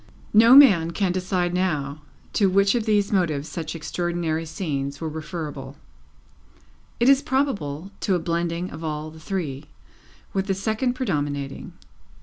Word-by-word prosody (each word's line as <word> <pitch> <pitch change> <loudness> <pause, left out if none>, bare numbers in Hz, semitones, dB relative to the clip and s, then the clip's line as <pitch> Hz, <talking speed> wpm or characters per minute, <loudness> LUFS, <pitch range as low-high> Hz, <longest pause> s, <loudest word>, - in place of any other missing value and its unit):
No 230 +4 +8
man 195 - +7
can 180 +2 0
decide 180 -1 -1
now 155 -6 -1 0.3
to 200 -2 +3
which 195 +1 +3
of 235 -2 -1
these 205 -1 +2
motives 160 -7 0
such 165 -1 -5
extraordinary 165 0 -2
scenes 145 -5 -3
were 165 - -3
referable; 155 -4 -6 1.2
it 240 - +3
is 275 0 +6
probable, 200 - -2
to 190 - +1
a - - +1
blending 170 +1 -2
of 160 - -8
all 155 0 -4
the 160 - -13
three, 155 -6 -4 0.7
with 195 0 -1
the 195 - 0
second 220 +6 -1
predominating. 145 - -3
175 Hz, 140 wpm, -24 LUFS, 155-200 Hz, 1.2 s, No